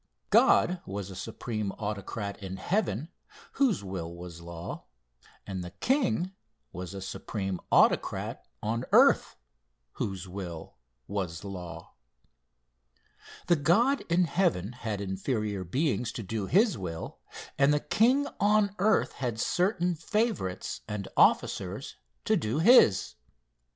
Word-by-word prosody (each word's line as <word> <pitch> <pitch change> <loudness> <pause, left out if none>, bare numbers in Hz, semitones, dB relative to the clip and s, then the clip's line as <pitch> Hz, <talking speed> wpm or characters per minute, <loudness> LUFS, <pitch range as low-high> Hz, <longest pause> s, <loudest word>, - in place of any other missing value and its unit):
God 180 0 +5
was 100 0 -5
a - - -8
supreme 110 +1 -4
autocrat 105 0 -5
in 95 -1 -6
heaven, 155 - -1 0.4
whose 250 - +1
will 90 -4 -5
was 85 -1 -9
law, 85 0 -7 0.6
and 95 -2 -4
the 90 - -6
king 235 - 0 0.4
was 90 +1 -6
a 95 - -6
supreme 95 -1 -4
autocrat - - +2 0.2
on 115 +3 -1
earth - - +5 0.6
whose 95 - -4
will 90 -3 -7 0.3
was 95 -4 -3
law. 90 -5 -8 1.5
The 175 - +4
God 225 - +3
in 175 +2 +4
heaven 160 - +1
had 110 -5 -4
inferior 100 +1 -2
beings 125 - 0
to 115 - -5
do 100 0 -3
his 205 - +3
will, 80 -3 -6 0.4
and 140 +1 +5
the 150 - +3
king 255 - +3
on 205 0 +3
earth 215 +3 +3
had 120 -4 -3
certain 180 - +1
favorites 175 - -2
and 105 -2 -4
officers - - +2 0.3
to - - +3
do 110 +6 -1
his. 155 - +6
105 Hz, 120 wpm, -29 LUFS, -, 1.5 s, his